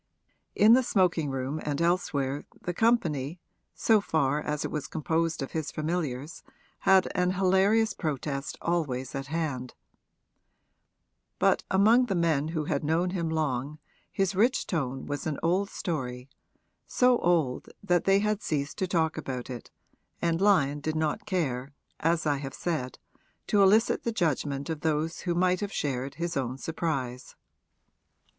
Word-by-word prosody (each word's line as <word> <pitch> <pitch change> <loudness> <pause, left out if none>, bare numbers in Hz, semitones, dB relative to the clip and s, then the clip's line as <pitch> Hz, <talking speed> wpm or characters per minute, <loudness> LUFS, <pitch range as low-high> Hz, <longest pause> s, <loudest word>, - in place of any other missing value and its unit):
In 215 +2 +7
the 255 - +6
smoking 180 - +1
room 135 +3 -3
and 145 -1 -2
elsewhere 145 -5 0 0.2
the 175 - -4
company, 170 - +1 0.4
so 220 -2 +3
far 150 -5 +1
as 150 -1 -2
it - - -4
was 150 -2 -3
composed 160 0 -1
of 135 - -6
his 160 -2 -3
familiars, 155 -3 -3 0.4
had 190 -1 +4
an 180 0 +1
hilarious 195 +4 +3
protest 140 -2 -3
always 145 -7 -1
at 135 0 -4
hand; 140 -5 -3 1.6
but - - +3
among 225 +6 +5
the 195 - -1
men 160 -4 +1
who 160 -2 -2
had 145 -1 -1
known 165 +4 +1
him 170 -3 -2
long 150 -2 -1 0.3
his 195 0 0
rich 235 +7 +2
tone 135 -6 -2
was 145 +1 -4
an 150 - -2
old 185 +4 +1
story, 125 -6 -4 0.6
so 250 -1 +3
old 160 -8 +1
that 175 -3 +2
they 195 0 +5
had 210 +1 0
ceased 145 +2 -2
to 190 - 0
talk 160 -3 0
about 130 -4 -5
it, 120 -2 -8 0.5
and 170 0 0
Lyon 150 -8 +3
did 155 +2 -3
not 155 +6 -1
care, 140 -7 -2 0.3
as 165 +1 +1
I 145 -2 +2
have 135 -1 -6
said, 150 -8 -3 0.5
to 205 - +3
elicit 210 +4 +4
the 235 - -2
judgment 145 - -1
of 160 -3 -4
those 160 +1 -1
who 175 -2 -2
might 180 +1 +2
have 205 -1 -3
shared 135 -1 -2
his 170 +2 -3
own 130 -1 -2
surprise. 135 -6 -3
160 Hz, 150 wpm, -28 LUFS, 140-180 Hz, 1.6 s, In